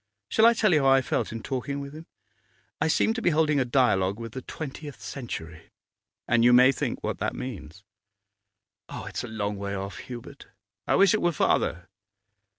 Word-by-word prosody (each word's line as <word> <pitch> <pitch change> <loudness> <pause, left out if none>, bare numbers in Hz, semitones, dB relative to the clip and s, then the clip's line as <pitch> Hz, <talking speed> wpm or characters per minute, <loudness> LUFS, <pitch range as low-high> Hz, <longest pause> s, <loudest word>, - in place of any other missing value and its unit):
Shall 220 +1 +5
I 235 - +5
tell 215 -4 +3
you 150 - +4
how 135 - +2
I 135 0 +5
felt - - -1
in 115 0 -6
talking 140 +1 -3
with 140 0 -7
him? 160 +2 -11 0.7
I 155 - +3
seemed 220 +7 +2
to - - -2
be 175 - +3
holding 155 -2 +2
a 130 - +1
dialogue 105 -6 +2
with 115 -1 -6
the 130 - -6
twentieth 145 -3 -8
century, 95 - -7 0.6
and 120 0 +3
you 120 +1 +6
may 125 +2 +7
think - - -3
what - - -3
that - - -2
means.' 100 -8 -8 1.1
'Ah, - - -7
it's - - -5
a - - -5
long 105 -2 -3
way 100 0 -4
off, 100 0 -5
Hubert.' 125 +3 -10 0.4
'I - - +3
wish 195 -2 +5
it 215 - +1
were 175 - +2
farther. 90 - 0
130 Hz, 195 wpm, -26 LUFS, 105-150 Hz, 1.1 s, may